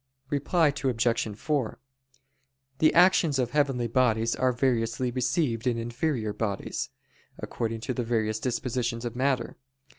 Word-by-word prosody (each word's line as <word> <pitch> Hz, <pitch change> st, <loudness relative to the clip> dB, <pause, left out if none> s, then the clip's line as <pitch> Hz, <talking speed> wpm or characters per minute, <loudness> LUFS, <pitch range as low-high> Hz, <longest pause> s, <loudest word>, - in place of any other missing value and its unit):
Reply 150 Hz, +3 st, +2 dB
Obj. 120 Hz, -6 st, 0 dB
4: 140 Hz, -4 st, -1 dB, 1.0 s
The 155 Hz, -, +5 dB
actions 170 Hz, -4 st, +5 dB
of 125 Hz, -2 st, 0 dB
heavenly 140 Hz, -5 st, +1 dB
bodies 115 Hz, -1 st, +2 dB
are 130 Hz, 0 st, +2 dB
variously 120 Hz, -1 st, 0 dB
received 125 Hz, -1 st, 0 dB
in 120 Hz, -2 st, +1 dB
inferior 120 Hz, -1 st, -2 dB
bodies, 105 Hz, -2 st, -3 dB, 0.5 s
according 115 Hz, -1 st, -4 dB
to 130 Hz, -, -2 dB
the 125 Hz, -, -2 dB
various 110 Hz, -2 st, 0 dB
dispositions 120 Hz, -1 st, -2 dB
of 120 Hz, -1 st, -4 dB
matter. 130 Hz, -2 st, 0 dB
125 Hz, 125 wpm, -27 LUFS, 115-135 Hz, 1.0 s, The